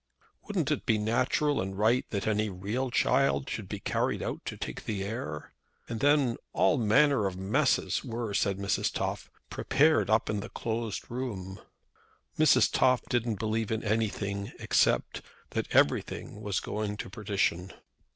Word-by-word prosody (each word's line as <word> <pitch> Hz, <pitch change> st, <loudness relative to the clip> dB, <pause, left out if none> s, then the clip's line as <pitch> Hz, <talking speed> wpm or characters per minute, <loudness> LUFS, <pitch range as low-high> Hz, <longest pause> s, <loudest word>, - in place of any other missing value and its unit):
Wouldn't 175 Hz, -9 st, -1 dB
it 150 Hz, -, -2 dB
be 110 Hz, -, +3 dB
natural 120 Hz, +7 st, +1 dB
and 95 Hz, 0 st, -4 dB
right 115 Hz, +4 st, +2 dB
that 100 Hz, -4 st, -2 dB
any 110 Hz, 0 st, +1 dB
real 105 Hz, +8 st, -3 dB
child 125 Hz, -, +2 dB
should -, -, -5 dB
be -, -, -4 dB
carried -, -, -1 dB
out -, -, -4 dB
to -, -, -5 dB
take -, -, -6 dB
the 100 Hz, -3 st, -2 dB
air? 80 Hz, -8 st, -5 dB, 0.3 s
"And 115 Hz, -1 st, -4 dB
then 140 Hz, -3 st, +3 dB, 0.2 s
all 150 Hz, -, +3 dB
manner 110 Hz, +1 st, +4 dB
of 90 Hz, -1 st, -5 dB
messes 95 Hz, +3 st, +1 dB
were," 115 Hz, -2 st, -4 dB
said 100 Hz, -1 st, +1 dB
Mrs. 100 Hz, 0 st, 0 dB
Toff, -, -, -3 dB, 0.2 s
"prepared 155 Hz, -4 st, +3 dB
up 110 Hz, 0 st, +3 dB
in 105 Hz, -, -1 dB
the 110 Hz, +3 st, -6 dB
closed 115 Hz, -2 st, -4 dB
room." 100 Hz, -7 st, -5 dB, 0.8 s
Mrs. -, -, +5 dB
Toff 125 Hz, -1 st, +3 dB
didn't 120 Hz, -3 st, 0 dB
believe 110 Hz, +1 st, -1 dB
in 110 Hz, 0 st, -1 dB
anything, 100 Hz, -2 st, -1 dB
except -, -, +1 dB, 0.3 s
that -, -, -2 dB
everything 105 Hz, -, +1 dB
was 100 Hz, -3 st, -1 dB
going 105 Hz, -1 st, -3 dB
to -, -, -5 dB
perdition. 95 Hz, -3 st, -1 dB
110 Hz, 155 wpm, -29 LUFS, 100-120 Hz, 0.8 s, Mrs